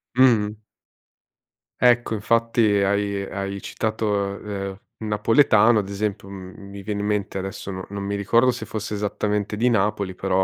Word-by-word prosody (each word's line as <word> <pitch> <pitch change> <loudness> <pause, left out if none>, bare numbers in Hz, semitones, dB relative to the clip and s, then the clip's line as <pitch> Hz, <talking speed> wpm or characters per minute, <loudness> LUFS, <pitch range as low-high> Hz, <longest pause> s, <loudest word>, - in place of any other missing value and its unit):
Mh-mh. 110 -5 +4 1.2
Ecco, 120 -2 +4
infatti 115 +2 +1 0.2
hai 100 0 +1
hai 100 0 -4
citato, 110 0 -2
uhm, 100 -1 -3 0.2
il 110 - -5
napoletano 110 +1 +4
ad 100 -1 -4
esempio 100 0 -3
mhmm, 100 +1 -10
mi 100 0 -8
viene 105 0 -3
in 105 - -2
mente 105 -2 -1
adesso, 95 +1 -5
no 95 0 -6
non 100 0 -5
mi 100 +1 -2
ricordo 115 +5 +3
se 120 - -6
fosse 110 -1 -5
esattamente 105 0 -1
di 120 +3 +3
Napoli 105 -3 0
però, 95 0 +1
105 Hz, 155 wpm, -23 LUFS, 100-110 Hz, 1.2 s, Mh-mh